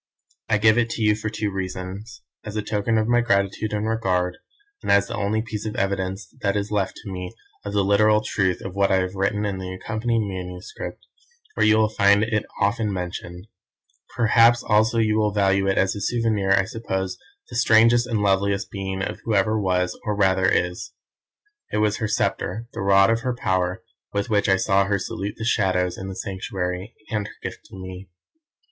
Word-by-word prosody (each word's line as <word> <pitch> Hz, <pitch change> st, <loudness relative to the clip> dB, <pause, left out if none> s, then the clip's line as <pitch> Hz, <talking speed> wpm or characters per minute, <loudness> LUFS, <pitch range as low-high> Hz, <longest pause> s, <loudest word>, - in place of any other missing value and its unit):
I 110 Hz, -, +4 dB
give 110 Hz, +2 st, +4 dB
it 115 Hz, -1 st, +1 dB
to 115 Hz, -, -2 dB
you 105 Hz, 0 st, +4 dB
for 110 Hz, 0 st, -4 dB
two 110 Hz, -1 st, -2 dB
reasons; 95 Hz, +3 st, -6 dB, 0.2 s
as 105 Hz, 0 st, -7 dB
a 105 Hz, -, -1 dB
token 105 Hz, +2 st, 0 dB
of 110 Hz, 0 st, +1 dB
my 120 Hz, 0 st, +4 dB
gratitude 100 Hz, -1 st, 0 dB
and 105 Hz, +1 st, -1 dB
regard, 90 Hz, -5 st, 0 dB, 0.4 s
and -, -, -1 dB
as 100 Hz, 0 st, +5 dB
the -, -, -6 dB
only 110 Hz, +2 st, 0 dB
piece 110 Hz, -2 st, -5 dB
of 105 Hz, -, -5 dB
evidence 95 Hz, 0 st, -2 dB
that 100 Hz, -1 st, +1 dB
is 100 Hz, +1 st, -3 dB
left 100 Hz, -3 st, 0 dB
to 100 Hz, -, -7 dB
me 90 Hz, +3 st, -6 dB, 0.3 s
of 100 Hz, -, -5 dB
the 100 Hz, -1 st, +2 dB
literal 105 Hz, +2 st, +4 dB
truth 95 Hz, -4 st, 0 dB
of 95 Hz, -, -6 dB
what 100 Hz, 0 st, +2 dB
I -, -, +5 dB
have 95 Hz, 0 st, 0 dB
written 100 Hz, +2 st, 0 dB
in 100 Hz, -2 st, -2 dB
the 95 Hz, 0 st, -5 dB
accompanying 110 Hz, +3 st, -1 dB
manuscript, 90 Hz, 0 st, -7 dB, 0.5 s
where -, -, +2 dB
you 110 Hz, 0 st, +5 dB
will 110 Hz, 0 st, +4 dB
find 100 Hz, -1 st, +4 dB
it 110 Hz, -1 st, -1 dB
often 105 Hz, +1 st, +1 dB
mentioned. 90 Hz, -1 st, -5 dB, 0.7 s
Perhaps 115 Hz, 0 st, +5 dB
also 110 Hz, +2 st, +3 dB
you 110 Hz, -1 st, +2 dB
will 105 Hz, -1 st, +2 dB
value 100 Hz, -1 st, +2 dB
it 95 Hz, -, +1 dB
as 95 Hz, 0 st, +2 dB
a 100 Hz, -, -5 dB
souvenir 110 Hz, -5 st, 0 dB
of, 95 Hz, -, +5 dB
I 95 Hz, -, +2 dB
suppose, 95 Hz, -4 st, -4 dB, 0.3 s
the -, -, -7 dB
strangest 120 Hz, 0 st, +5 dB
and 110 Hz, -4 st, -1 dB
loveliest 100 Hz, 0 st, +1 dB
being 95 Hz, -1 st, -4 dB, 0.2 s
who 110 Hz, -, 0 dB
ever 110 Hz, +3 st, +2 dB
was, 90 Hz, -1 st, 0 dB
or 105 Hz, -1 st, -1 dB
rather, 95 Hz, -2 st, +2 dB
is. 90 Hz, -1 st, -1 dB, 0.8 s
It -, -, -1 dB
was 105 Hz, 0 st, +2 dB
her 110 Hz, -, -1 dB
sceptre, 110 Hz, +1 st, -1 dB
the -, -, -5 dB
rod 100 Hz, +2 st, +5 dB
of 115 Hz, -, +1 dB
her 125 Hz, +1 st, -2 dB
power, 95 Hz, -3 st, -1 dB, 0.3 s
with 100 Hz, +3 st, -2 dB
which 105 Hz, -1 st, +2 dB
I 95 Hz, -, +5 dB
saw 95 Hz, +1 st, +2 dB
her 100 Hz, 0 st, +1 dB
salute 100 Hz, +1 st, -4 dB
the 115 Hz, -, -4 dB
Shadows 95 Hz, -5 st, +1 dB
in 95 Hz, -, -7 dB
the 95 Hz, -, -6 dB
Sanctuary, 95 Hz, +1 st, -4 dB, 0.2 s
and 105 Hz, -2 st, -1 dB
her -, -, -11 dB
gift -, -, -6 dB
to -, -, -13 dB
me. 95 Hz, 0 st, -9 dB
100 Hz, 200 wpm, -23 LUFS, 95-110 Hz, 0.8 s, as